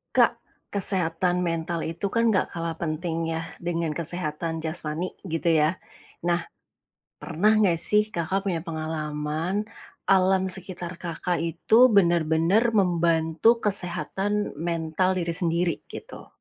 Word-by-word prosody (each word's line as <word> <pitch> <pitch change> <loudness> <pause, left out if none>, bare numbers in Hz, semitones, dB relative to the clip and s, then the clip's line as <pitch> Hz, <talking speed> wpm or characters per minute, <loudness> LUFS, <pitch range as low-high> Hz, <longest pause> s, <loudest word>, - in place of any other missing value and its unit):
Kak, - - +4 0.3
kesehatan 180 -2 +2
mental 165 0 -2
itu 165 +5 -3
kan 230 +3 +2
nggak 190 - +2
kalah 165 -1 -5
penting 165 0 -2
ya, 165 0 -4
dengan 170 -2 -2
kesehatan 160 0 -3
jasmani, 160 +2 -2 0.2
gitu 165 0 0
ya. 155 +2 +3 0.5
Nah, 170 0 0 0.8
pernah 210 +7 +2
nggak 195 -6 +3
sih 210 +5 +2
Kakak 185 +2 -1
punya 190 -4 -1
pengalaman, 155 +3 -2 0.5
alam 190 0 +3
sekitar 180 -2 -5
Kakak 175 0 -2
itu 170 +7 +1 0.2
bener-bener 170 +5 +3
membantu 170 +3 +2
kesehatan 200 +1 -1
mental 170 +2 0
diri 175 -2 -1
sendiri, 170 0 +1
gitu? - - -10
170 Hz, 115 wpm, -25 LUFS, 165-190 Hz, 0.8 s, Kak